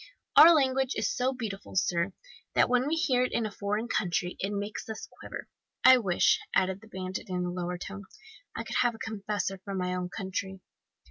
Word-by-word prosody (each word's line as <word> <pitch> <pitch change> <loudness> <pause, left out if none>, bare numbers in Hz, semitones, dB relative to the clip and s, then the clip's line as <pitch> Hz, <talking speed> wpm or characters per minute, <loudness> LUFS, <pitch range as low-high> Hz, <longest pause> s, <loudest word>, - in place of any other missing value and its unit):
"Our 335 +1 +10
language 265 -2 +2
is - - 0
so 255 +1 +1
beautiful, 225 -6 -6
sir, 175 0 +1 0.4
that - - +5
when 250 +2 +2
we 315 - +1
hear 255 -6 +2
it 255 - -1
in 235 - +1
a 215 - -3
foreign 210 +3 -2
country 180 -5 -1
it 195 - -2
makes 205 +2 -4
us 220 - -6
quiver. - - -7 0.4
I 260 0 +9
wish," 185 -6 +3 0.2
added 190 +1 +1
the 220 - -15
bandit 190 0 -6
in 180 -1 -1
a 175 - -2
lower 180 0 -3
tone, 195 +2 -8 0.5
"I - - -3
could - - -3
have 240 -2 +2
a - - -11
confessor 205 -3 -3
from 200 -1 -4
my 180 0 -1
own 180 -1 -3
country." 190 0 -4
200 Hz, 200 wpm, -29 LUFS, 185-240 Hz, 0.5 s, Our